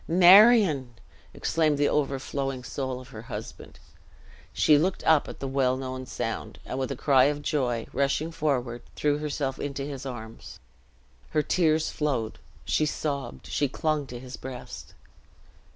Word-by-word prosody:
"Marion!" 180 - +6 0.4
exclaimed 155 -3 +1
the 145 0 +3
overflowing 135 -2 -2
soul 130 -1 -4
of 130 - -13
her - - -9
husband. - - -8 0.7
She 150 - +4
looked 180 +6 +1
up 160 -2 +4
at - - -9
the 135 - -3
well 130 -1 +1
known 130 -1 -5
sound, - - -4
and 130 - -4
with 135 +1 -2
a - - -2
cry 135 -1 +4
of 145 +1 -1
joy, 125 -8 0
rushing 140 +4 0
forward, 130 -7 -1
threw 145 0 +1
herself 145 -3 -3
into 140 -1 -4
his 140 -2 -6
arms; 115 -4 -8 0.7
her 150 - +1
tears 160 -2 +2
flowed, 130 -8 -2 0.3
she 155 - +1
sobbed 140 -5 -4
she 145 - 0
clung 150 0 -1
to 120 -1 -7
his 125 0 -9
breast. 130 -2 -9
140 Hz, 150 wpm, -27 LUFS, 130-150 Hz, 0.7 s, Marion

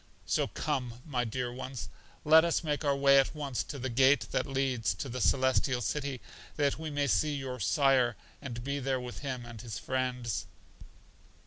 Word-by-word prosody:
So - - +1
come, 125 -1 -3
my 125 -5 -1
dear 120 +1 -3
ones, 130 -1 -6 0.4
let 160 +1 +8
us 170 0 +1
make 150 -1 -1
our 140 -1 +2
way 140 0 +6
at 135 +3 +1
once 140 -6 -2
to 145 - -6
the 130 0 -3
gate 135 +4 +4
that - - 0
leads 130 -7 0
to 115 - -5
The 125 +1 -4
Celestial 130 +1 +2
City, 135 +3 -2 0.4
that 145 -1 +1
we 160 -1 -4
may 145 -1 0
see 150 +2 +2
your 130 -2 -5
sire 130 -4 +3 0.3
and 120 -5 -6
be 140 +2 -2
there 130 -1 0
with 125 -1 -7
him 130 -4 -4
and 115 -2 -9
his 115 -3 -6
friends. 125 -3 -2
130 Hz, 185 wpm, -31 LUFS, 125-140 Hz, 0.4 s, let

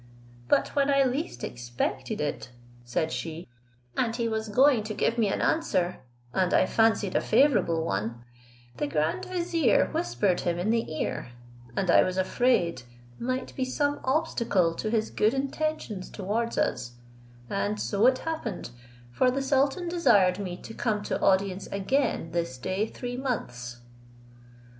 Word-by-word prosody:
"But - - +3
when 280 0 +1
I 275 -1 +5
least 270 +6 -2
expected 120 +2 -3
it," 150 -3 -3 0.3
said 120 +7 -1
she, 165 +1 -5 0.5
"and 230 -2 0
he 235 -1 0
was 220 -1 -2
going 255 +2 +5
to 215 -1 -4
give 230 +1 0
me 220 - +3
an 195 - -1
answer, 185 - +1 0.3
and 185 -1 +2
I - - +5
fancied 220 -2 +2
a - - +3
favourable 215 - +3
one, 115 +1 -3 0.5
the 145 - -1
grand 150 +2 0
vizier 340 - +2
whispered 120 +11 +1
him 170 -1 -1
in 185 +5 0
the 230 -7 0
ear, 140 -5 -3 0.4
and 185 -3 +1
I - - +7
was 185 0 -1
afraid 185 - +2 0.4
might 255 +2 -3
be 260 - -1
some 285 +3 0
obstacle 235 - +1
to 215 - -3
his 220 -1 0
good 220 +5 +2
intentions 270 -7 -2
towards 220 +4 -2
us, 120 -1 -1 0.5
and 100 0 -1
so 160 - +2
it 255 0 +4
happened, 245 - -4 0.4
for 250 - +3
the 270 +2 -1
sultan 275 +6 +1
desired 205 - +4
me 180 -3 -4
to 225 - -8
come 215 -3 -1
to - - -2
audience 195 0 +2
again 200 - 0
this 165 -7 -2
day 185 - -1
three 245 +2 -6
months." 125 - -4
210 Hz, 150 wpm, -27 LUFS, 170-255 Hz, 0.5 s, I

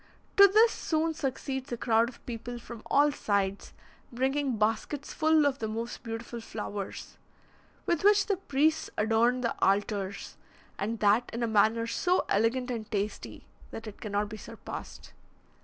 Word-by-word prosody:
To 400 -1 +9
this 440 +4 +5
soon 320 0 -1
succeeds 265 -2 -4
a 240 - -2
crowd 230 0 +2
of 255 - -16
people 240 0 -6
from 235 -1 -10
all 290 +1 +4
sides, 200 -6 -1 0.4
bringing 265 +1 0
baskets 225 +7 -1
full 315 -1 +3
of 280 -1 +1
the 220 - -2
most 230 +2 -5
beautiful 230 +1 -6
flowers, 205 -3 -6 0.7
with 340 -1 0
which 410 0 +5
the 400 -3 0
priests 315 -2 +1
adorn 225 +3 +2
the 235 - 0
altars, 200 0 0 0.4
and 220 +3 -2
that 210 +4 +3
in 235 +1 -3
a - - +1
manner 220 +1 +3
so 360 +10 +1
elegant 245 +5 +1
and 225 -3 -5
tasty, 205 0 -4 0.2
that 225 - -8
it 215 -2 -10
cannot 205 -1 -1
be 215 +1 -8
surpassed. - - -9
235 Hz, 155 wpm, -29 LUFS, 215-285 Hz, 0.7 s, To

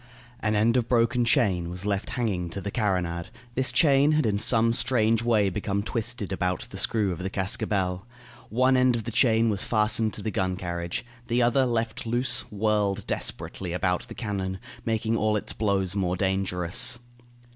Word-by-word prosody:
An 105 0 0
end 115 +4 +3
of 120 -2 -1
broken 120 0 +2
chain 100 - +2
was 90 +2 -4
left 100 -1 -1
hanging 95 -8 -1
to 100 - -5
the 100 +1 -5
carronade. 90 -6 -1 0.3
This 130 +2 +2
chain 145 -1 +4
had 155 -3 +2
in 100 -2 +1
some 115 +1 +4
strange 115 -2 +2
way 115 -4 +2
become 100 +1 -2
twisted 115 -3 -3
about 90 -1 -1
the 95 - -7
screw 100 0 +1
of 90 - -5
the 95 +1 -3
cascabel. 95 0 -1 0.4
One 130 +3 +3
end 130 -1 +3
of 115 - -3
the 115 - -5
chain 115 -1 +3
was 100 - 0
fastened 110 0 +2
to - - -6
the 110 - -2
gun 95 -1 -1
carriage. 85 +2 -4 0.2
The 120 +1 +2
other, 130 +2 +3
left 115 -1 -2
loose, 120 +1 0
whirled 105 -1 0
desperately 90 -3 -3
about 90 0 -1
the - - -9
cannon, 95 -4 -3 0.3
making 115 0 0
all 110 -1 +1
its - - -3
blows 100 -3 0
more 90 -2 0
dangerous. 95 0 +1
105 Hz, 180 wpm, -26 LUFS, 95-115 Hz, 0.4 s, chain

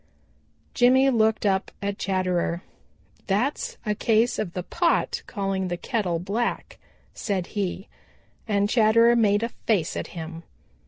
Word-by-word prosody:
Jimmy 260 +2 +5
looked 220 -2 +2
up 190 -1 +1
at 200 0 -3
Chatterer. 185 -2 -1 0.6
"That's 275 - -1
a 210 - +1
case 225 +3 +2
of 180 -5 -3
the 180 - -4
pot 340 - 0
calling 195 -2 -2
the 175 -1 -3
kettle 185 -5 -1
black," 200 +7 -3 0.3
said 195 -4 -2
he 195 -2 -3 0.6
and 205 -1 +2
Chatterer 230 +1 +5
made 210 -2 +3
a 230 - -1 0.2
face 195 -8 +1
at - - -3
him. 165 0 -6
205 Hz, 130 wpm, -25 LUFS, 185-230 Hz, 0.6 s, Jimmy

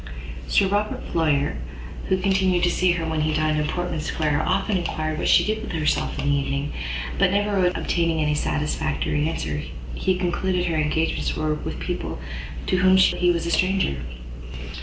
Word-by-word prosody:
Sir 200 - +4
Robert 205 +2 -1
Floyer, 145 - +1 0.5
who 190 - +3
continued 190 -2 +2
to 175 - +4
see 180 0 +3
her 165 -2 -2
when 160 -1 -1
he 155 0 +1
dined 155 -1 +1
in 150 - 0
Portman 175 -2 -2
Square, 150 -1 0
often 195 +3 +1
enquired 155 -2 -2
what - - -1
she - - +5
did 215 +1 -1
with 220 - -6
herself 155 -2 0
in - - -3
an 145 - +2
evening; 140 +1 -1 0.5
but - - +5
never 200 -2 +2
obtaining 170 -2 0
any 150 -1 +2
satisfactory 150 - -1
answer, 75 - -3 0.3
he 185 - 0
concluded 180 0 0
her 170 -2 0
engagements 155 +1 0
were 155 -1 0
with 150 - -5
people - - -3 0.5
to 185 - +1
whom 185 +1 +5
he 180 -1 +4
was 170 -1 +1
a 170 - -1
stranger. 185 - +2
165 Hz, 175 wpm, -24 LUFS, 150-185 Hz, 0.5 s, she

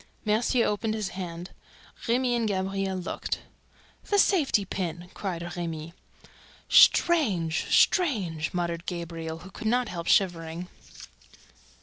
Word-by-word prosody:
Mercier 230 +3 +2
opened 215 +1 -1
his 210 -3 -2
hand; 180 -1 -7 0.6
Remy 245 +1 +2
and 230 -2 0
Gabriel 195 -1 -1
looked. 180 - -4 0.7
"The 410 - +3
safety 305 - +3
pin!" 175 -1 -5
cried 175 -3 -5
Remy. 165 -2 -5 0.7
"Strange! 200 - +4
Strange!" 195 - +2
muttered 170 -1 -3
Gabriel, 165 -2 -5
who 190 - -11
could 220 - -5
not 245 +2 +1
help 170 -2 -5
shivering. 175 -2 +1
185 Hz, 110 wpm, -27 LUFS, 170-220 Hz, 0.7 s, Strange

